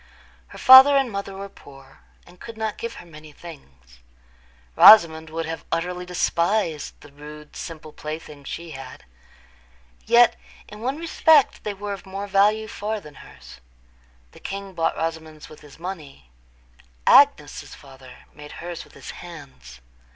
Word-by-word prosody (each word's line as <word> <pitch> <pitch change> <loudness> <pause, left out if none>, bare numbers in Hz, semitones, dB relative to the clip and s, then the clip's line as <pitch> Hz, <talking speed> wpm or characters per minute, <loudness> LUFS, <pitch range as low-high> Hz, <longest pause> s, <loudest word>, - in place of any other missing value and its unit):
Her - - -14
father 265 +1 +8
and 270 -4 0
mother 200 -1 -6
were 195 +1 -7
poor, 135 -7 -17 0.3
and 175 +1 -19
could 230 -1 -11
not 220 -1 -4
give 230 0 -6
her - - -12
many 155 -2 -14
things. 65 - -15 0.8
Rosamond 160 -6 +7
would 165 +1 -4
have 165 0 -6
utterly 180 +2 -3
despised 170 -2 -1
the 145 - -16
rude, 150 +1 -13
simple 155 -2 -9
playthings 150 -2 -9
she 170 -1 -7
had. 135 -3 -11 1.0
Yet 240 0 +5 0.3
in 210 - -12
one 260 +4 -3
respect 320 -3 +2
they 210 -1 -4
were 205 +1 -6
of 195 0 -11
more 195 +1 -6
value 205 +2 +2
far 215 +1 -5
than 150 -6 -14
hers: - - -15 0.7
the - - -17
king 195 0 -7
bought 165 -2 -1
Rosamond's 160 -2 -6
with 155 - -14
his 145 -2 -16
money; 155 - -9 0.7
Agnes's - - +3
father 135 -2 -16
made 150 0 -12
hers 175 -1 -8
with - - -21
his - - -10
hands. 135 - -13
170 Hz, 150 wpm, -22 LUFS, 150-205 Hz, 1.0 s, father